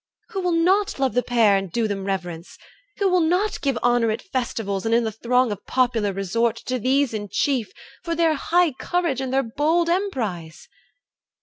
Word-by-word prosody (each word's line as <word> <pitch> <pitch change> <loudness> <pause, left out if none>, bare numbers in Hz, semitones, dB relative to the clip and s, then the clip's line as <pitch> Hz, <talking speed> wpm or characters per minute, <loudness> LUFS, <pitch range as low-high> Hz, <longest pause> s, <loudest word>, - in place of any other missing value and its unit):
Who 390 -4 -3
will 360 -1 0
not 375 +5 +2
love 270 -2 0
the 250 - +2
pair 230 -5 +3
And 195 -2 -2
do 230 +2 0
them 195 -2 -4
reverence? 180 -3 -5 0.4
Who 400 - +2
will 365 -1 +3
not 360 +6 0
give 275 -4 0
Honour 240 -1 +3
at 215 - -3
festivals, 225 - -3
and 225 0 +2
in 235 - +3
the 220 - -2
throng 245 +2 +1
Of 205 - -7
popular 235 -5 +1
resort, 215 +4 0
to 255 0 -2
these 265 +2 +1
in 205 -2 -4
chief, 260 -7 0 0.3
For 335 -1 -2
their 330 -1 +3
high 340 +3 +2
courage 290 0 -1
and 260 -1 -3
their 270 +1 +2
bold 315 +8 +1
emprise?' 210 - -3
250 Hz, 190 wpm, -23 LUFS, 215-330 Hz, 0.4 s, pair